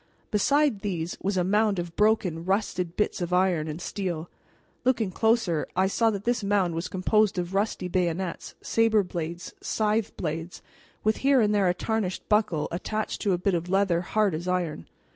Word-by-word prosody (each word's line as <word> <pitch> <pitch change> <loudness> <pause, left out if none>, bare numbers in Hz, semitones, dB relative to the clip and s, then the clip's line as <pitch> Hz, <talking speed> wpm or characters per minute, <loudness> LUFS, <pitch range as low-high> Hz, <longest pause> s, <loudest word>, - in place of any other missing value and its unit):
Beside 280 +2 +2
these 175 -4 -3
was 195 0 -1
a 180 - +3
mound 205 +2 +2
of 170 -1 -4
broken, 205 -6 +2
rusted 185 -2 -1
bits 210 -2 0
of 175 0 -2
iron 180 -4 +2
and 155 +1 -5
steel. 175 -3 -4 0.5
Looking 235 -6 +1
closer, 220 -7 +1
I 185 +1 +3
saw 225 +4 +2
that 200 -2 -3
this 240 -1 0
mound 195 -4 +1
was 165 +2 -3
composed 200 +2 +2
of 180 +1 -3
rusty 200 -2 0
bayonets, 180 0 -2
saber 225 -2 +3
blades, 170 -1 -5
scythe 215 0 0
blades, 165 +1 -4 0.4
with 215 0 +2
here 275 -1 +4
and 210 -2 +3
there 200 -3 +3
a 180 - +1
tarnished 215 -3 -2
buckle 210 -8 +2
attached 215 +5 -3
to 200 - +2
a - - +1
bit 185 +2 0
of 170 +1 -2
leather 190 -3 +2
hard 205 +1 +1
as 165 +3 -4
iron. 175 - -2
190 Hz, 180 wpm, -26 LUFS, 175-215 Hz, 0.5 s, here